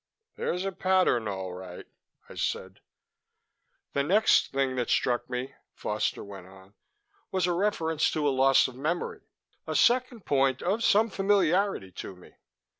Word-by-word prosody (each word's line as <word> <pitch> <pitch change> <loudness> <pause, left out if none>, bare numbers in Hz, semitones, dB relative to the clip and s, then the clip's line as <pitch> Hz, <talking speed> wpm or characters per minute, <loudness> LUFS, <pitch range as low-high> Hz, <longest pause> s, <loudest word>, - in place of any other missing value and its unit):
"There's 180 +2 -2
a 195 - -1
pattern, 185 - +2
all 95 -2 -4
right," 90 -1 -9 0.4
I - - -12
said. 95 0 -3 1.1
"The 140 - +1
next 200 +10 +3
thing 135 -1 0
that 125 - -1
struck 120 -1 +1
me," 125 +2 -4 0.2
Foster - - -2
went 100 -3 -10
on, 95 +1 -17 0.6
"was 185 -2 +1
a 180 - +1
reference 170 -4 0
to 150 -2 0
a - - +3
loss 135 0 +4
of 130 - -9
memory 155 +7 -3 0.5
a - - -3
second 245 -3 +2
point 135 -2 +1
of 205 +6 0
some 220 +1 +3
familiarity 195 - +1
to 90 - -8
me. 90 - -17
145 Hz, 150 wpm, -28 LUFS, 120-190 Hz, 1.1 s, loss